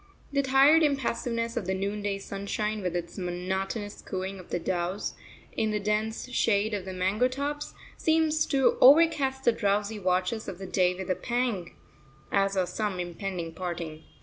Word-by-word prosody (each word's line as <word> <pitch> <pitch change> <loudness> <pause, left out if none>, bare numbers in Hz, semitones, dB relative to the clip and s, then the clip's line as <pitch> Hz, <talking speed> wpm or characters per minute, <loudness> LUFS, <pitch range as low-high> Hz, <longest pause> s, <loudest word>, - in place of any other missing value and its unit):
The 280 -1 +2
tired 275 +4 +6
impassiveness 235 -5 0
of 220 -7 -2
the 190 - 0
noonday 200 +1 -2
sunshine, 200 +2 -3
with 180 -2 -2
its 170 +1 -4
monotonous 190 +4 -3
cooing 190 0 -4
of 180 - -13
doves 180 +2 -2 0.4
in 220 - +1
the 210 0 0
dense 210 +3 -1
shade 215 -3 +2
of 200 -3 -3
the 190 - -5
mango 190 +7 +2
tops, 285 +3 -4 0.2
seems 315 -1 +2
to 270 -3 +2
overcast 275 -2 +6
the 240 - +5
drowsy 210 0 0
watches 185 +4 0
of 175 - -5
the 190 - -7
day 180 -1 +2
with 185 0 -3
a - - +2
pang, 235 -8 -2 0.6
as 195 0 +2
of 185 -1 +2
some 205 -1 -2
impending 175 -1 -4
parting. 170 -3 -5
205 Hz, 160 wpm, -28 LUFS, 185-240 Hz, 0.6 s, tired